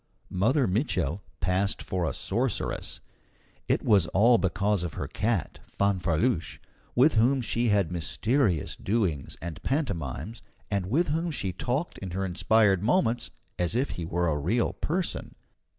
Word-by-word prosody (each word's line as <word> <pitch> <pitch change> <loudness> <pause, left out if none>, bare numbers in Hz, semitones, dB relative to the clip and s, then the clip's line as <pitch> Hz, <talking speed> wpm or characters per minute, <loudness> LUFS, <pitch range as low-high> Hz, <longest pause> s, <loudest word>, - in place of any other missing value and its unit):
Mother 125 +9 +2
Mitchel 95 - 0 0.2
passed 90 +3 0
for 90 -3 -1
a - - -4
sorceress. 120 +3 -2 0.7
It - - +1
was 100 -6 +4
all 115 +7 +4
because 100 +1 +1
of 85 -4 -4
her - - -3
cat, 110 -5 -1
Fanfreluche, 95 0 0 0.4
with 135 +6 +5
whom 125 +5 +3
she 120 0 0
had 100 -5 +2
mysterious 90 - 0
doings 95 -10 -1
and 85 0 -6
pantomimes, 100 - -2 0.3
and 100 -3 0
with 155 - +1
whom 165 +3 0
she 95 - -2
talked 130 - -2
in 95 - -6
her 95 - 0
inspired 95 +1 +3
moments, 120 - +1 0.3
as 90 +4 +1
if 130 +4 +1
he 85 - -5
were 85 +1 0
a 75 -2 0
real 110 +11 +1
person. 175 +3 -3
100 Hz, 145 wpm, -27 LUFS, 90-120 Hz, 0.7 s, with